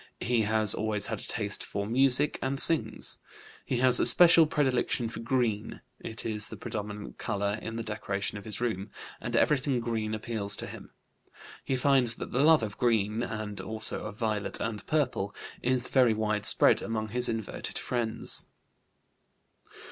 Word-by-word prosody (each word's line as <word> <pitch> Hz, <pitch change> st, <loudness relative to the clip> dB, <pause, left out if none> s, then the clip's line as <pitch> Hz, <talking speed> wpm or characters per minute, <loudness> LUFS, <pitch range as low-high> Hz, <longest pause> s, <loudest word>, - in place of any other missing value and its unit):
He 120 Hz, -1 st, +1 dB
has 110 Hz, -2 st, +5 dB
always 105 Hz, -2 st, 0 dB
had -, -, -3 dB
a -, -, -6 dB
taste 105 Hz, -2 st, -1 dB
for 100 Hz, 0 st, -4 dB
music, 130 Hz, +5 st, +2 dB
and 135 Hz, +1 st, -1 dB
sings. 165 Hz, 0 st, +2 dB, 0.4 s
He 130 Hz, -, -2 dB
has 125 Hz, -1 st, +8 dB
a -, -, +2 dB
special 165 Hz, +5 st, +7 dB
predilection 130 Hz, -5 st, 0 dB
for 115 Hz, -, -7 dB
green; 115 Hz, -3 st, -2 dB, 0.2 s
it 115 Hz, 0 st, -8 dB
is 105 Hz, -1 st, 0 dB
the -, -, -8 dB
predominant 105 Hz, -1 st, -6 dB
color 100 Hz, 0 st, -2 dB
in 110 Hz, -, -6 dB
the 115 Hz, -, -4 dB
decoration 105 Hz, -2 st, -3 dB
of 100 Hz, -, -14 dB
his 110 Hz, -, -3 dB
room, 110 Hz, -5 st, -3 dB, 0.3 s
and -, -, -4 dB
everything 135 Hz, -3 st, +2 dB
green 110 Hz, -2 st, -2 dB
appeals 110 Hz, -2 st, -4 dB
to -, -, -5 dB
him. -, -, -10 dB, 0.7 s
He 135 Hz, -, -1 dB
finds 130 Hz, -3 st, +2 dB
that -, -, -7 dB
the 125 Hz, -, -1 dB
love 155 Hz, -5 st, +5 dB
of 105 Hz, -2 st, -6 dB
green 110 Hz, -2 st, +1 dB
(and 110 Hz, -3 st, -5 dB
also 110 Hz, -1 st, -4 dB
of 105 Hz, -1 st, -7 dB
violet 110 Hz, -3 st, -1 dB
and 110 Hz, -2 st, -4 dB
purple) 125 Hz, -10 st, -1 dB, 0.3 s
is 125 Hz, 0 st, +2 dB
very 125 Hz, -4 st, +3 dB
widespread 105 Hz, -1 st, +3 dB
among 110 Hz, -1 st, -3 dB
his 125 Hz, +3 st, +1 dB
inverted 110 Hz, -2 st, -4 dB
friends. 120 Hz, -3 st, -2 dB
115 Hz, 165 wpm, -28 LUFS, 105-125 Hz, 0.7 s, has